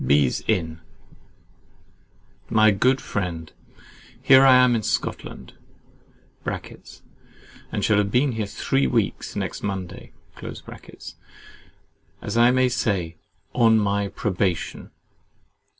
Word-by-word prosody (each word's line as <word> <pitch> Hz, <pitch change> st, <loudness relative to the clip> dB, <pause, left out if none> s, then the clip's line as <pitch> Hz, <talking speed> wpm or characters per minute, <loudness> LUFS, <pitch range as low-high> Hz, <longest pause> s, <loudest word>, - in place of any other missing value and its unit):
Bees 70 Hz, -2 st, +2 dB
Inn. 85 Hz, -6 st, -1 dB, 1.7 s
My 110 Hz, -1 st, +5 dB
good 130 Hz, +7 st, +2 dB
friend, 85 Hz, -5 st, -4 dB, 0.7 s
Here 130 Hz, 0 st, +6 dB
I 130 Hz, -1 st, +7 dB
am 125 Hz, -1 st, +5 dB
in 115 Hz, -, 0 dB
Scotland -, -, -4 dB, 0.9 s
(and -, -, -8 dB
shall 105 Hz, -, +3 dB
have 100 Hz, -1 st, 0 dB
been 130 Hz, +6 st, +2 dB
here 110 Hz, -3 st, -3 dB
three 70 Hz, -8 st, 0 dB
weeks, -, -, -1 dB
next -, -, -4 dB
Monday) 95 Hz, -3 st, -5 dB, 2.1 s
as -, -, -5 dB
I 120 Hz, +1 st, +5 dB
may 130 Hz, 0 st, +3 dB
say, 95 Hz, -9 st, -1 dB, 0.4 s
ON 115 Hz, -2 st, +4 dB
MY 100 Hz, -1 st, 0 dB
PROBATION. 95 Hz, -4 st, -2 dB
105 Hz, 100 wpm, -23 LUFS, 90-120 Hz, 2.1 s, I